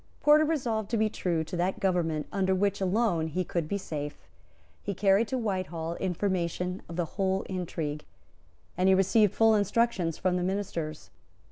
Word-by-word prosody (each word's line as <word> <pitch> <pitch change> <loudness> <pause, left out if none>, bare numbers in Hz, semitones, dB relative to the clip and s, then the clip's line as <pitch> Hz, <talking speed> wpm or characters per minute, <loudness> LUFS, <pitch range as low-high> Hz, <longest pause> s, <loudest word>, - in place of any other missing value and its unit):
Porter 300 +1 +5
resolved 240 -9 -1
to 230 - 0
be 215 0 +1
true 170 -3 -1
to 160 - -6
that 180 +2 0
government 165 -5 0
under 190 -1 +1
which 200 +1 0
alone 190 -4 +1
he 180 +4 -1
could 170 -2 -2
be 200 - -1
safe; 150 -6 -5 0.6
he 200 - -4
carried 200 +4 +3
to 260 - -2
Whitehall 185 -7 -2
information 180 -1 -1
of 170 - -6
the 175 -1 0
whole 190 +2 -1
intrigue; 160 -5 -4 0.7
and 185 +2 +3
he 190 - +6
received 195 +2 +3
full 225 0 +5
instructions 205 -4 +1
from 185 -1 +1
the 180 - -1
ministers. 180 -5 -3
185 Hz, 165 wpm, -28 LUFS, 170-205 Hz, 0.7 s, he